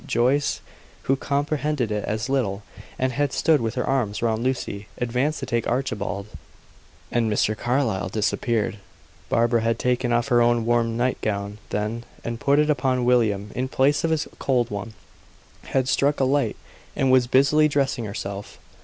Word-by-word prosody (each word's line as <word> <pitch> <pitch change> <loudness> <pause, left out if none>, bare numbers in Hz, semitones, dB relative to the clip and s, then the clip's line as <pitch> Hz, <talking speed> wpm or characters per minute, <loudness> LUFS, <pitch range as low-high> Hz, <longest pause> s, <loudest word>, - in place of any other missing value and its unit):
Joyce, 130 +5 +1 0.4
who 135 - +2
comprehended 145 -3 -1
it 105 -1 -1
as 110 +3 -2
little, 110 -7 -1 0.3
and 130 0 0
had 145 +1 0
stood 155 -5 +3
with 115 0 -2
her 125 - -1
arms 115 -6 -1
round 115 0 0
Lucy, 115 -6 -2
advanced 125 +5 0
to - - -2
take 115 -1 -1
Archibald, 110 -6 -2 0.9
and 115 -2 +1
Mr. 105 +1 +1
Carlyle 115 -5 0
disappeared. 110 +1 -1 0.5
Barbara 115 0 +2
had 115 0 +1
taken 125 0 0
off 120 +3 +1
her 120 -2 +4
own 120 -1 +3
warm 115 -1 +1
night 125 +1 0
gown 100 0 -3
then, 105 +3 -2 0.2
and 115 0 -4
put 140 +3 +3
it 150 0 +4
upon 130 -3 +1
William 105 -5 +2
in 130 +2 -2
place 135 +2 +2
of 165 - +1
his 160 -1 0
cold 125 -4 +1
one 105 +2 -5 0.7
had 130 -1 0
struck 140 +2 +2
a - - +3
light 140 +2 +1 0.4
and 135 -1 +2
was 130 -2 +5
busily 140 +4 +4
dressing 135 -5 0
herself. 100 -1 -6
120 Hz, 165 wpm, -24 LUFS, 110-135 Hz, 0.9 s, was